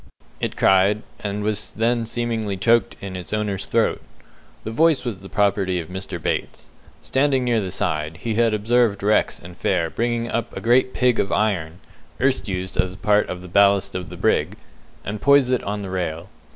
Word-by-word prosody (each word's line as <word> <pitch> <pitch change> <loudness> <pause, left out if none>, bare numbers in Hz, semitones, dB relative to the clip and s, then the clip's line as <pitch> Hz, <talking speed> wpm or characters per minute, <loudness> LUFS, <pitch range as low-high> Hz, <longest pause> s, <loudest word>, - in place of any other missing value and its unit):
it - - -3
cried, 95 +3 +3 0.2
and 105 0 -3
was 105 0 -1
then 115 0 +1
seemingly 115 -4 -2
choked 115 +5 +2
in 95 -1 -6
its 90 -1 -7
owner's 105 -2 -2
throat. 115 -1 +1 0.6
The 110 - -5
voice 155 +2 +3
was 110 -6 -3
the 95 0 -11
property 100 -3 +1
of 80 - -7
Mr. 95 -1 -5
Bates. - - -4 0.3
Standing 135 -1 +1
near 120 -3 +1
the 95 - -4
side, 80 -4 -2
he 115 +5 -3
had 115 +1 +3
observed 110 -1 +1
Rex 105 +1 +2
and 85 +1 -12
Fair 85 -2 0
bring 120 0 -1
up 115 0 -3
a - - -2
great 125 +2 +2
pig 125 -2 +2
of 100 - 0
iron, 95 -5 -1 0.4
erst 130 -1 +1
used 95 -1 -4
as 95 0 0
part 105 +1 +2
of 90 0 -5
the - - -9
ballast 100 +2 +3
of 90 -1 -5
the - - -9
brig, - - +1 0.5
and 105 0 -4
poise 140 -2 +5
it 125 - +2
on 105 0 -3
the 95 - -6
rail. 90 -1 -3
105 Hz, 190 wpm, -22 LUFS, 95-115 Hz, 0.6 s, poise